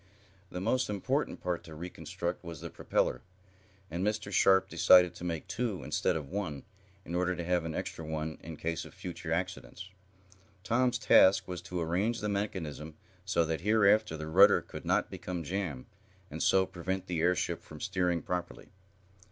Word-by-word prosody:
The 90 - -5
most 115 +6 +1
important 130 +8 -1
part 90 -1 -2
to 80 - -10
reconstruct 85 +1 -5
was 85 -3 -7
the - - -7
propeller, - - 0 0.7
and 85 +3 -2
Mr. 105 0 -1
Sharp 95 -1 +5
decided 90 -2 +6
to - - -10
make 85 -3 -3
two, 115 -7 -2
instead - - 0
of 75 -4 -4
one, 90 -7 -4 0.4
in 85 - -7
order 90 +1 +1
to 85 - -4
have 90 -1 0
an 80 - -4
extra 80 - -4
one 80 0 -4
in 80 -1 -8
case 85 +1 -2
of - - -13
future 85 -2 -6
accidents. 90 +1 -4 0.7
Tom's 125 +5 +2
task 95 0 +5
was 90 -2 -5
to 90 +1 -5
arrange 95 +8 0
the 105 - -2
mechanism 80 -7 -3 0.3
so 90 -3 +2
that, 80 0 -2
hereafter, 105 -2 +3
the 75 - -5
rudder 100 +6 +6
could - - -9
not - - +1
become 90 -2 -5
jammed, 85 -6 -3 0.5
and - - -5
so 95 0 +4
prevent 95 +1 -4
the 85 -3 -2
airship 90 0 +1
from - - -12
steering 90 -3 0
properly. 90 -1 -4
90 Hz, 170 wpm, -31 LUFS, 80-100 Hz, 0.7 s, decided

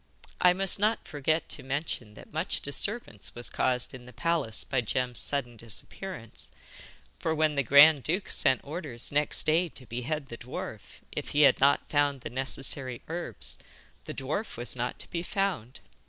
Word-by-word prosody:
I 180 - +7
must 195 +1 +1
not 215 +2 +1
forget 155 +2 -1
to - - -5
mention 130 -6 -4
that - - -14
much 160 +4 0
disturbance 140 - -2
was 120 0 -2
caused 125 -1 0
in 125 -1 -11
the - - -11
palace 135 -3 0
by 130 -2 0
Jem's 125 +2 -1
sudden 120 -5 -3
disappearance, 115 - -6 0.7
for 160 -1 -1
when 155 -1 +2
the 140 - +1
grand 140 +3 +7
duke 180 +8 -2
sent 130 -1 +4
orders 145 -6 -3
next 145 +1 +2
day 165 +3 +3
to 130 - -9
behead 135 +5 -4
the 115 - -8
dwarf, 110 -3 -8
if - - -5
he - - +6
had 140 -3 +6
not 140 +2 +3
found 145 -2 +1
the - - -7
necessary 130 0 +4
herbs, 170 +2 -4 0.5
the - - -6
dwarf 155 - -4
was 120 +2 -3
not 125 0 -3
to - - -9
be 170 - -2
found. 175 - -2
140 Hz, 170 wpm, -28 LUFS, 125-160 Hz, 0.7 s, I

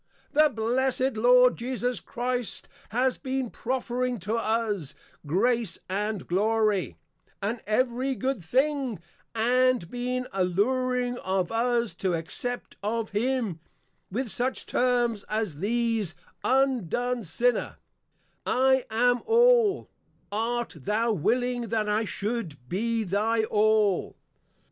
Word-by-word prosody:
The 305 +1 +5
Blessed 255 +3 0
Lord 250 +3 +5
Jesus 245 0 -2
Christ 245 -2 -3 0.2
has 250 +4 +1
been 260 -3 -2
profering 250 0 -2
to 210 +5 -2
us, 220 -9 -1 0.3
Grace, 225 - +1
and 205 0 -2
Glory, 210 +1 +1 0.4
and 220 +4 -2
every 255 +4 +1
good 260 -6 -2
thing, 265 - 0 0.4
and 245 -4 +2
been 250 +1 -2
alluring 245 +7 0
of 185 -1 -1
us 235 -2 +1
to 185 -3 +1
Accept 165 +10 -4
of 220 +2 -2
Him, 225 -4 -1 0.5
with 235 +5 -2
such 255 +1 -1
Terms 240 -4 +1
as 215 -9 -2
these, 225 -2 0 0.3
_Undone 250 -2 +1
Sinner, 235 +8 0 0.7
I 265 0 +3
am 245 +2 +2
All; 470 -3 +4 0.4
Art 230 -1 -2
thou 215 - 0
willing 245 +6 0
that 220 -2 0
I 210 +2 +1
should 190 - -4
be 225 - -1
thy 215 +4 +1
All? 215 -3 +2
235 Hz, 110 wpm, -27 LUFS, 210-250 Hz, 0.7 s, The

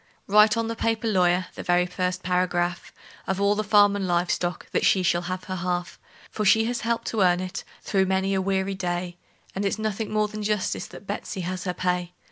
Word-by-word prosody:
Write 210 +2 +5
on 230 0 0
the 230 - -3
paper, 225 0 -1
lawyer 180 -3 +2
the - - -7
very 175 0 +2
first 180 0 -2
paragraph 180 -1 0 0.4
Of 190 0 -1
all 200 +1 +3
the 215 +1 -1
farm 205 -1 +5
and 195 -2 -2
live 175 0 +1
stock 175 0 -2
that - - 0
she 190 - +4
shall 175 0 +2
have 185 0 -3
her 185 0 -5
half; 175 0 -3 0.3
For 215 - -2
she 220 +2 +5
has 240 +1 -2
helped 230 +1 -1
to 220 - -1
earn 180 -1 +4
it, 185 0 -5 0.2
through 190 -2 +1
many 190 +1 +1
a 190 - +1
weary 190 0 0
day, 175 -1 -3 0.4
And 195 - -3
it's 200 - 0
nothing 215 0 -3
more 215 0 +2
than 215 0 -7
justice 210 -1 -1
that - - -12
Betsey 195 -1 -4
has 180 +1 -4
her 180 -1 -2
pay. 180 -1 -1
190 Hz, 220 wpm, -25 LUFS, 180-210 Hz, 0.4 s, Write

